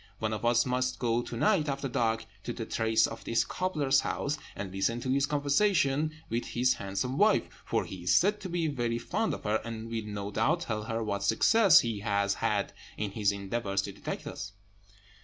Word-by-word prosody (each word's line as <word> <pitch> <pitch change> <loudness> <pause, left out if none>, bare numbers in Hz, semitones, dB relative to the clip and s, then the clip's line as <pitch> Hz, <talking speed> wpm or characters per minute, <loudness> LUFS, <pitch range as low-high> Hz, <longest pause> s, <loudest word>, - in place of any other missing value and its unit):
One 110 0 -2
of 110 - -4
us 120 0 +3
must 125 0 0
go 120 -1 +1
to 120 - -6
night, 165 - +2
after 140 0 -2
dark, 115 -2 0 0.2
to 120 - -3
the 115 - -5
terrace 110 0 +2
of 115 - -6
this 115 - +1
cobbler's 150 -7 +1
house, 140 +2 -1 0.2
and 100 -1 -5
listen 105 +5 0
to 130 - -2
his 140 +1 +2
conversation 150 0 +2 0.2
with 115 +2 -1
his 125 +2 +2
handsome 100 +8 -3
wife; 215 +1 +5 0.2
for - - -1
he 90 -2 -8
is - - +4
said 205 +3 +3
to 190 - -5
be 170 -1 -1
very 120 -6 -1
fond 205 - -1
of - - -11
her, 105 +1 0
and 115 0 -6
will, 110 -2 -3
no 100 -1 -5
doubt, 145 - +1
tell 110 -7 -3
her 115 0 -2
what 100 -2 -2
success 180 - +6
he 115 -3 -3
has 100 -1 +1
had - - -1 0.2
in 105 -2 -2
his 105 -1 +1
endeavours 100 0 -2
to 100 - -5
detect - - -6
us." - - -6
120 Hz, 205 wpm, -30 LUFS, 105-140 Hz, 0.2 s, success